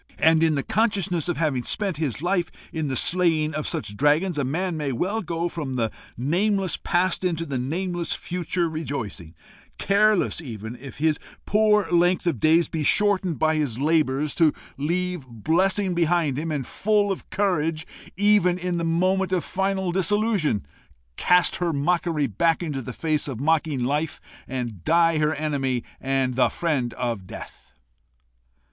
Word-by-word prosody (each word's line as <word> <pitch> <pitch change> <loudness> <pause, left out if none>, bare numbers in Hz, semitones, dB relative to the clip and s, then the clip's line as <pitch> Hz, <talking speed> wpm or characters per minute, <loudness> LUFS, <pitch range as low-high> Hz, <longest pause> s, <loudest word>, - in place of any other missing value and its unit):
and 160 0 +4
in 160 -2 +3
the 140 - -1
consciousness 195 -7 0
of 175 - -1
having 145 -6 0
spent 195 - -2
his 150 -2 -2
life 175 -2 +1 0.2
in 160 -3 -2
the 135 - -2
slaying 160 -2 +2
of 150 0 -3
such 150 -11 -3
dragons, 150 - +2
a - - +1
man 170 +7 -1
may 150 -3 -2
well 190 - -1
go 170 -1 -2
from 150 -6 -4
the 115 -3 0 0.3
nameless 185 - +1
past 180 0 0
into 165 -2 -1
the 135 -5 -3
nameless 175 +6 -2
future 175 0 -2
rejoicing, 125 - -5 0.4
careless 205 -2 +2
even 110 -5 -7
if 135 +2 -10
his 155 0 +1 0.3
poor 210 -1 +3
length 175 +1 +3
of 165 -9 0
days 160 +4 +4
be 160 - -3
shortened 190 0 +2
by 155 0 +2
his 145 -7 -1
labours 150 -1 +1
to 160 -3 +4 0.2
leave 175 0 -2
blessing 180 - +1
behind 170 -4 +1
him, 160 +1 -3
and, 140 -4 -2
full 205 - +1
of 190 - -5
courage 165 -5 0 0.3
even 200 -3 +4
in 180 -1 -2
the - - -2
moment 185 +3 +1
of 185 -2 +1
final 190 -1 -1
dissolution, 195 - +1 0.5
cast 180 -1 +3
her 175 -2 0
mockery 160 0 0
back 165 - +1
into 145 -5 -3
the 125 - -6
face 155 +3 -1
of 130 -5 -5
mocking 150 -2 +1
Life, 145 +4 -1 0.3
and 120 -8 -5
die 165 -1 +3
her 150 0 +1
enemy, 135 -5 -1 0.2
and 135 -1 0
the 130 - +3
friend 140 -8 -1
of 115 -7 -3
Death!" - - -11
165 Hz, 160 wpm, -24 LUFS, 140-180 Hz, 0.5 s, and